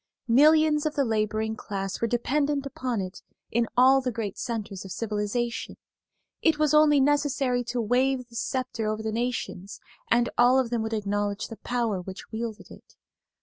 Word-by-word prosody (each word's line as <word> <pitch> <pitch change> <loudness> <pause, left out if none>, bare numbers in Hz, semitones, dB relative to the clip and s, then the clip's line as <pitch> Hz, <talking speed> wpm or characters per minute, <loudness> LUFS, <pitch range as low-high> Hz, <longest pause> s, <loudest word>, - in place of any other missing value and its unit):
Millions 300 +4 +5
of 305 - -4
the 280 - +2
laboring 220 0 -1
class 195 -2 -5
were 230 - +2
dependent 280 +4 0
upon 255 -4 -3
it 185 0 -7 0.3
in 235 0 +1
all 265 +2 +6
the 255 -1 -2
great 215 -4 -4
centers 215 -6 -4
of 190 - -9
civilization; 225 +3 -3 0.6
it 320 -2 +3
was 305 -1 +2
only 300 -1 +6
necessary 275 -3 +1
to 245 +1 -3
wave 250 +2 +1
this 235 -1 -6
sceptre 255 -4 -2
over 215 0 -2
the 220 - -2
nations 225 -5 -3 0.3
and 240 0 +3
all 245 +2 +6
of 255 -3 +1
them 235 -2 0
would 220 0 -3
acknowledge 205 -1 -2
the 225 - -8
power 230 -6 -1
which 185 +1 -9
wielded 220 -1 -5
it. - - -16
235 Hz, 170 wpm, -26 LUFS, 215-265 Hz, 0.6 s, all